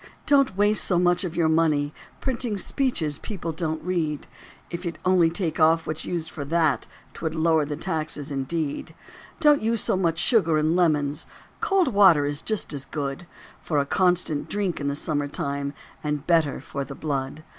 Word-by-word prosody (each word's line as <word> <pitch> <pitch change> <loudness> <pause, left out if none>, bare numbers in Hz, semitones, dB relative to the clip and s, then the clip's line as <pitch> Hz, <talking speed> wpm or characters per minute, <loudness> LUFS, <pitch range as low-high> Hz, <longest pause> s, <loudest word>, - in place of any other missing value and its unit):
Don't 275 -8 +3
waste 205 +1 +4
so 180 - +2
much 175 +1 +3
of 175 -2 -4
your 170 -2 +2
money 155 -2 +2 0.3
Printing 240 -5 -1
speeches 180 - 0
people 180 -6 -5
don't 160 -1 -3
read. 160 -4 -2 0.5
If 175 +1 -5
you'd 170 -2 -4
only 180 -3 +4
take 170 -2 -2
off 160 +1 +4
what's 155 0 -3
used 165 -2 -3
for 145 - -6
that 160 -1 +1 0.3
'Twould 160 -1 -4
lower 160 -1 +2
the 150 0 -4
tax 160 -1 -2
indeed. 145 +2 -3 0.4
Don't 295 -2 +5
use 225 +1 +1
so - - +2
much 170 -3 0
sugar 170 -10 +3
and 155 +2 +2
lemons; 150 -4 +1 0.3
Cold 390 -8 +2
water 190 - +5
is 145 0 -1
just 215 -7 -2
as 135 -2 -5
good 140 +3 -5 0.3
For 155 - -2
a 140 - +2
constant 170 -3 +1
drink 200 -6 -2
in 140 - -2
the 140 - -1
summer 145 -1 -1
time 140 0 -3 0.3
And 150 -1 -2
better 165 -5 +2
for 140 - -5
the 140 0 -8
blood. 140 0 -3
160 Hz, 175 wpm, -25 LUFS, 150-185 Hz, 0.5 s, Don't